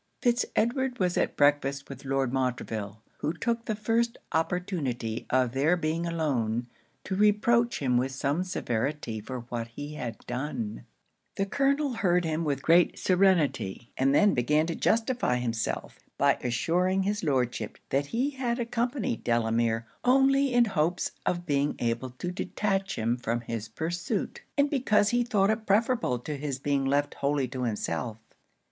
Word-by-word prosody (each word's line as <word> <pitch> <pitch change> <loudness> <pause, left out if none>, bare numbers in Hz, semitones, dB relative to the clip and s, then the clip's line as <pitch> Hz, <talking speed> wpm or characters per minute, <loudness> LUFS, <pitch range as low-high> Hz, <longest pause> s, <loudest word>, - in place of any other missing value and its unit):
Fitz 240 -1 +2
Edward 250 +2 +1
was 180 -4 +1
at - - 0
breakfast 140 -1 +2
with 140 0 -10
Lord 135 -1 0
Montreville; 110 -5 -2 0.2
who 150 +2 -1
took 230 +6 -2
the 220 - -1
first 230 +2 0
opportunity 155 - -2
of 130 -2 +2
their 145 +7 +2
being 165 +1 -1
alone, 125 -9 0 0.4
to 190 - -4
reproach 220 +4 +3
him 125 -2 +3
with 130 +2 0
some 140 +5 0
severity 130 -7 -2
for 125 +4 -6
what 115 -1 -3
he 145 +6 -7
had 120 -7 -5
done. 150 - -4 0.5
The 195 - 0
Colonel 275 +5 +1
heard 180 -6 +2
him 160 +1 -1
with 140 -3 -1
great 170 +2 +4
serenity; 175 - +1
and 135 +1 +2
then 205 +5 +5
began 150 +5 +2
to 165 0 -3
justify 230 - +1
himself, 115 -2 -3 0.2
by 140 0 +3
assuring 180 +10 +1
his 205 +1 -1
Lordship 125 -7 -1
that 140 +1 +1
he 255 - 0
had 250 -3 -2
accompanied 240 - -1
Delamere 115 -1 +1 0.2
only 270 +2 +4
in 245 -1 +5
hopes 175 -3 0 0.2
of 175 -1 0
being 145 -2 +1
able 120 +2 -1
to 130 +8 -5
detach 195 +1 -1
him 115 +2 0
from 120 -1 -2
his 115 -2 -5
pursuit, 170 +9 -3 0.2
and 285 0 +4
because 230 -8 +2
he 240 +1 +2
thought 210 -4 +2
it 220 0 -3
preferable 225 - +2
to 145 +5 -5
his 140 -2 -3
being 140 0 0
left 140 +2 +1
wholly 140 -1 0
to 130 -1 -3
himself. 110 0 -2
155 Hz, 155 wpm, -28 LUFS, 125-210 Hz, 0.5 s, then